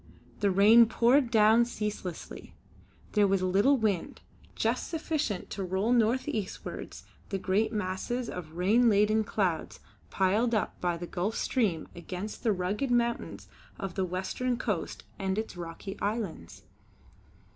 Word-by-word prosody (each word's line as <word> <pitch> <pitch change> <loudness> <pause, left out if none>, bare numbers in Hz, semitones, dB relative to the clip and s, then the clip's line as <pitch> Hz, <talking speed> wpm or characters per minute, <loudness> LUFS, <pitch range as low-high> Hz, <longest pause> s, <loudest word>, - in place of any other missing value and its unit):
The 205 - +2
rain 215 +5 +7
poured 245 +3 +3
down 220 0 +5
ceaselessly. 210 -7 -6 0.6
There 210 -2 +4
was 195 -1 +1
little 200 +10 +3
wind, 210 -7 -1 0.3
just - - 0
sufficient 310 - -2
to 195 - -3
roll 190 +5 0
north 240 +3 +2
eastwards 215 -9 -5 0.3
the 195 - -1
great 200 +4 +1
masses 210 +4 -2
of 165 -3 -7
rain 220 +7 +4
laden 215 +1 +3
clouds 190 -6 -2 0.3
piled 215 +5 +2
up 210 - -2
by 175 -1 0
the 175 - -6
Gulf 190 +5 -2
Stream 200 - 0
against 180 +4 -6
the 230 - +2
rugged 200 +7 -1
mountains 235 -1 -1 0.3
of 195 -2 -4
the 190 - -1
western 190 +7 -2
coast 210 -8 -3 0.2
and 190 0 -1
its 220 -2 -3
rocky 175 +3 -7
islands. 200 - -4
205 Hz, 135 wpm, -29 LUFS, 185-230 Hz, 0.6 s, rain